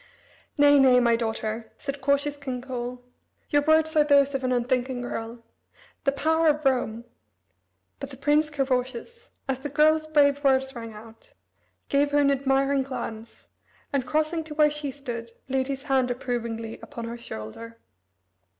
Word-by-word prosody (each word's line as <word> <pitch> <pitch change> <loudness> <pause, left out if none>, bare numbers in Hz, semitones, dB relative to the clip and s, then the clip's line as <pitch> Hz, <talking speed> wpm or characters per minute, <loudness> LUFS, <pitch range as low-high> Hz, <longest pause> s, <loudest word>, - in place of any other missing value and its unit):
"Nay, 290 0 +6
nay, 255 -2 +6
my 235 -1 +4
daughter," 220 -1 -3
said 275 -1 -6
cautious 280 +2 +1
King 265 -3 -5
Coel, 250 -1 -6 0.5
"your 290 -1 +4
words 315 +1 +3
are 305 - +6
those 280 -1 +4
of 270 -1 -2
an 255 - 0
unthinking 250 +1 0
girl. 230 -1 -6 0.6
The 275 - +4
power 320 +3 +1
of 300 -1 +2
Rome 235 -3 0 0.5
" - - -48
But 275 - -6
the 265 - -11
Prince 295 +3 +2
Carausius, 270 - -3
as 265 -1 -1
the 290 +2 -5
girl's 310 +2 +3
brave 285 -2 +3
words 265 -1 +2
rang 230 -1 -7
out, 225 +1 -14 0.5
gave 285 +1 +2
her - - +4
an 285 -1 +4
admiring 275 0 +2
glance, 235 -4 -7 0.5
and, 275 -2 +1
crossing 310 +5 0
to 305 -1 -8
where 300 -1 +4
she 295 -1 -4
stood, 245 -4 -6 0.2
laid 265 0 0
his 270 -1 -4
hand 265 -3 +1
approvingly 235 -3 -4
upon 240 -6 -7
her 235 +1 -6
shoulder. 230 - -8
270 Hz, 160 wpm, -26 LUFS, 245-290 Hz, 0.6 s, Nay